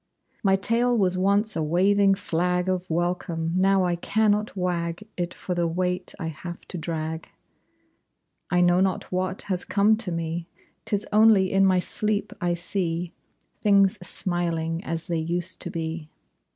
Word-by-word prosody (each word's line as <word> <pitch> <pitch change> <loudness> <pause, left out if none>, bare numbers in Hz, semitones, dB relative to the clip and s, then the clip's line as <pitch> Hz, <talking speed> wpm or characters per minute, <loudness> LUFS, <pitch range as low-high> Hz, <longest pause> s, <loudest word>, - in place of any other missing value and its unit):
My 195 -1 +3
tail 235 +5 +2
was 185 -3 +2
once 200 +3 +2
a 165 - -1
waving 195 +5 +3
flag 180 0 -1
Of 185 -1 -1
welcome. 170 -1 -1
Now 190 0 +3
I 175 -1 +1
cannot 210 +3 +1
wag 175 +2 -2
It 175 0 -2
for 185 - -5
the 175 -1 0
weight 180 +2 -2
I - - -4
have 170 +2 -7
to 180 - -5
drag. 160 0 -4 1.2
I 180 - +2
know 175 0 +4
not 190 -1 -1
what 185 +1 -2
has 185 -3 0
come 210 +2 +3
to 205 -5 -2
me. 165 0 -3 0.4
'Tis 205 0 -1
only 210 -3 +5
in 195 0 +4
my 185 -1 +3
sleep 210 +3 0
I 175 -1 +1
see 175 -1 -3 0.5
Things 200 -1 +4
smiling 170 -2 -1
as 165 0 -4
they 170 -2 -1
used 170 +3 -3
to 175 - -2
be. 160 -1 -5
180 Hz, 155 wpm, -25 LUFS, 170-195 Hz, 1.2 s, only